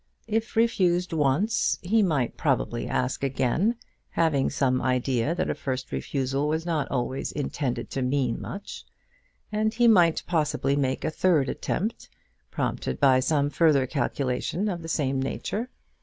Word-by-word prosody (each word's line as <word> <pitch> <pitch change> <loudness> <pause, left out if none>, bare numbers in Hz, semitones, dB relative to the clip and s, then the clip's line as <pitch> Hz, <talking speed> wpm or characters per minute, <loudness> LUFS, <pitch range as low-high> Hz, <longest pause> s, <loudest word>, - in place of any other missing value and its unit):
If 225 +1 -2
refused 180 -6 +2
once, 160 - +1
he 220 +5 +3
might 150 - +1
probably - - 0
ask 130 +2 -1
again, 135 - +1 0.3
having 155 -5 +1
some 130 -2 +1
idea 125 +3 0
that - - -1
a - - 0
first 130 -2 -4
refusal 135 - -1
was 160 +2 -1
not 160 -4 -1
always 130 +1 -2
intended 140 -3 -3
to 135 - -2
mean 130 -2 0
much, 200 +1 -7 0.7
and 215 +1 +1
he 240 0 +4
might 175 -7 +5
possibly 150 -5 0
make 135 -2 -1
a 155 - 0
third 155 -5 +2
attempt, 215 +5 -3 0.4
prompted - - -2
by 135 -2 +5
some 145 +2 +1
further 150 -4 +3
calculation 140 +6 -1
of 175 -3 -3
the 165 - -7
same 135 -4 0
nature. 210 - -3
145 Hz, 145 wpm, -26 LUFS, 130-180 Hz, 0.7 s, might